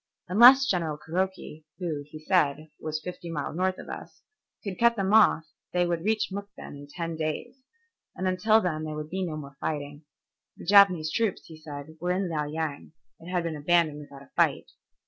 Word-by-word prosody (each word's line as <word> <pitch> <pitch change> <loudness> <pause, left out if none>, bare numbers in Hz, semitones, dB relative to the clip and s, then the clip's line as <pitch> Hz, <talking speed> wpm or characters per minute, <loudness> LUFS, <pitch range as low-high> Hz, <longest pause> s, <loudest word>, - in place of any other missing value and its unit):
Unless 245 +8 +8
General 170 - -1
Kuroki, 175 -1 -3
who, 165 -6 -3
he 155 - -9
said, 155 -4 +1
was 155 0 -3
fifty 175 +1 -8
miles 155 -2 -4
north 185 +1 0
of - - -10
us, - - -9 0.4
could 195 -3 -5
cut 235 0 +5
them 195 -1 0
off 215 -7 +6 0.3
they 180 0 +2
would 170 -1 -1
reach 215 +2 +1
Mukden 200 -4 -8
in 145 0 -11
ten 165 +1 -4
days, 160 +12 -4 0.5
and 185 - -2
until 215 +4 +4
then 155 -5 -2
there 155 -1 -4
would 150 0 -6
be 190 +1 -2
no 160 -4 -3
more 140 -2 -10
fighting. 145 0 -4 0.5
The - - -10
Japanese 185 -5 +6
troops, 220 0 -1
he 160 - -11
said, 155 0 -9
were 180 +1 0
in 185 0 -1
Liao 150 -2 -1
Yang, 155 -1 -4 0.3
it 165 - -11
had 180 -1 0
been 165 -2 -3
abandoned 155 0 +2
without 140 -2 -12
a 140 - -21
fight. - - +1
165 Hz, 190 wpm, -27 LUFS, 155-190 Hz, 0.5 s, Unless